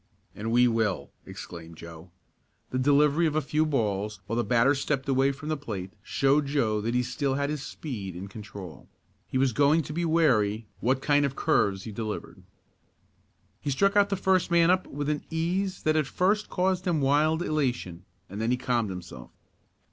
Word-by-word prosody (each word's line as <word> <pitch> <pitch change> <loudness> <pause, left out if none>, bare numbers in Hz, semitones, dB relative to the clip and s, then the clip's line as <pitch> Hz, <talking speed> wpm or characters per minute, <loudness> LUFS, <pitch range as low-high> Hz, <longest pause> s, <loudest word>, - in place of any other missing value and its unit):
"And 110 +2 -4
we 125 +1 +5
will!" 110 -5 -1 0.2
exclaimed 85 -1 -9
Joe. 85 +1 -11 0.6
The 130 - -1
delivery 145 +4 +4
of 155 - -2
a - - +4
few 155 +1 0
balls, 105 -7 -1
while 110 +4 -3
the 120 - +1
batter 125 +4 +3
stepped 135 -1 -2
away 135 0 +3
from 140 +3 -8
the 155 - +1
plate, 100 -9 -6
showed 140 +5 +1
Joe 115 -7 +1
that 115 +3 -2
he 125 - +2
still 135 +2 -1
had 140 +1 -1
his 150 -2 -3
speed 105 - -6
and 95 +3 -6
control. 100 -4 -10 0.4
He - - -2
was 130 -2 +2
going 145 +5 +3
to 150 - -7
be 170 +2 -1
wary 120 -10 +2
what 130 +3 0
kind 145 -1 +3
of 140 -1 -1
curves 100 - +1
he 110 - -7
delivered. 110 0 -5 1.2
He 145 - -4
struck 195 +9 +2
out 200 -1 +4
the 200 - 0
first 190 -2 +2
man 170 0 +5
up 185 0 +1
with 145 0 -4
an 150 -1 -1
ease 180 +4 -1
that 155 0 +2
at 155 -3 +1
first 205 +7 +1
caused 185 0 0
him 170 -3 +2
wild 150 +4 +2
elation, 125 - -2 0.2
and 100 +3 -6
then 115 - 0
he 125 - +2
calmed 120 -4 0
himself. 90 -9 -8
135 Hz, 190 wpm, -27 LUFS, 110-155 Hz, 1.2 s, we